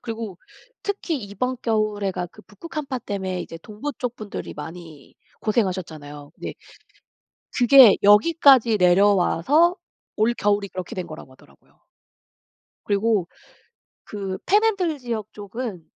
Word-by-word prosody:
그리고 225 -5 -6 0.4
특히 345 - -3
이번 225 +6 -3
겨울에가 210 -5 -1
그 - - -15
북극 215 - -13
한파 275 -4 -3
땜에 190 -5 -4
이제 165 -1 -9
동부 220 - -6
쪽 250 -2 -3
분들이 215 -3 -7
많이 160 -1 -10 0.3
고생하셨잖아요. 160 -9 -3
근데 - - -7 1.0
그게 245 -3 +8
여기까지 235 +2 +5
내려와서 200 - +4 0.4
올겨울이 205 -3 +1
그렇게 185 -1 -7
된 180 -2 -4
거라고 155 -4 -11
하더라고요. 70 - -24 1.0
그리고 205 -2 +1 0.8
그 195 -2 -5
팬핸들 395 -6 +2
지역 225 -4 -5
쪽은 205 -3 -6
210 Hz, 280 characters per minute, -23 LUFS, 185-250 Hz, 1.0 s, 그게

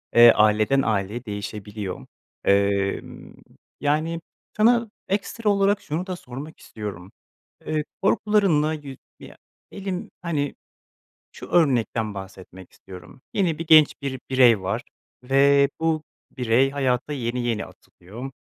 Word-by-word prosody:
eee, 120 0 +10
aileden 110 +6 +3
aileye 110 +2 -2
değişebiliyor. 105 -2 -6 0.4
Emm, 100 0 0 0.4
yani, 155 +3 0 0.4
sana 235 +1 +4 0.2
ekstra 210 +2 -1
olarak 200 0 +2
şunu 165 +5 -4
da 185 - -3
sormak 140 0 -9
istiyorum, 100 -4 -8 0.5
eee, 155 -1 -1 0.2
korkularınla 195 -7 +2
yüz 140 -4 -8 0.2
ya, - - -13 0.3
elim, 190 -2 -5
hani, 150 -5 -2 0.8
şu - - -10
örnekten 120 -9 +1
bahsetmek 95 -1 -11
istiyorum, 95 +8 -13
yeni 175 -6 +1
bir 165 - -5
genç 155 -2 +7
bir 130 -2 -4
birey 125 -5 +5
var 105 +6 -2 0.4
ve 140 +2 +4
bu 160 -1 +1 0.4
birey 125 +2 +3
hayata 135 0 -1
yeni 125 -2 -2
yeni 115 -3 -1
atılıyor 115 +10 -11
135 Hz, 115 wpm, -24 LUFS, 110-160 Hz, 0.8 s, eee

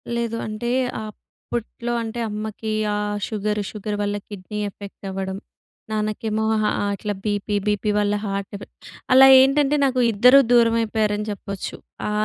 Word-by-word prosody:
లేదు. 235 -1 -2
అంటే 215 +2 -4 0.4
అప్పట్లో 235 +2 -6
అంటే 225 +1 -5
అమ్మకి 215 +1 -5 0.2
ఆహ్, 205 0 -2
షుగరు, 210 -1 -2
షుగర్ 210 0 -4
వల్ల 205 0 -1
కిడ్నీ 205 +1 -7
ఎఫెక్ట్ 200 0 -12
అవ్వడం. 190 0 -4 0.5
నాన్నకేమో 215 0 -1 0.2
హ - - +1 0.3
అట్లా 205 +1 -3
బీపీ, 205 -1 -1
బీపీ 210 +1 0
వల్ల 205 0 +1
హార్ట్ 195 -1 -3
ఎఫెక్ట్. 200 - -10 0.4
అలా 265 +1 +9
ఏంటంటే 275 +2 +4
నాకు 255 -1 +1
ఇద్దరూ 250 +6 +6
దూరమైపోయారని 225 -3 +2
చెప్పొచ్చు. 200 -1 -6 0.3
ఆ! - - -2
210 Hz, 130 wpm, -22 LUFS, 205-230 Hz, 0.5 s, అలా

